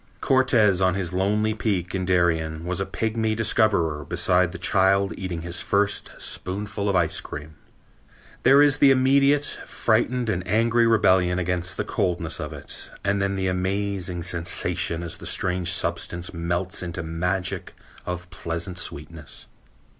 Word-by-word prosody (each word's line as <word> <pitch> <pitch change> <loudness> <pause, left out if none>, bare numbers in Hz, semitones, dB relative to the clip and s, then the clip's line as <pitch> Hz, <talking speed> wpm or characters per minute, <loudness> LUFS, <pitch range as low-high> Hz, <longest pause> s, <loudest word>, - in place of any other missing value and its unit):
Cortes 120 -8 +3
on 95 -1 +3
his 90 -3 -2
lonely 105 +4 +1
peak 100 -5 -2
in 95 -1 -2
Darien 80 -3 +1
was 90 +1 -2
a 95 - -2
pigmy 110 -1 -1
discoverer 100 -9 +1
beside 90 +4 +1
the 95 - -7
child 100 0 +2
eating 90 -4 -5
his 85 0 -2
first 100 0 0
spoonful 100 +2 -3
of 100 - +1
ice 85 -3 +2
cream. 75 +2 -8 0.9
There 140 +3 +6
is 145 -1 +3
the 140 - +7
immediate 140 +2 +4 0.2
frightened 120 +2 0
and 95 -4 0
angry 115 +3 +3
rebellion 95 -5 +3
against 90 0 -1
the - - 0
coldness 85 -3 -1
of - - -5
it, - - -9
and 100 0 +1
then 100 0 0
the 95 0 -2
amazing 95 -1 -2
sensation 85 -1 -1
as 85 - -4
the - - -7
strange 90 -1 +1
substance 90 -2 -1
melts 85 +3 -2
into 85 -1 -5
magic 90 +3 -2 0.3
of 90 0 -5
pleasant 85 0 -4
sweetness. 75 0 -7
95 Hz, 145 wpm, -24 LUFS, 85-105 Hz, 0.9 s, the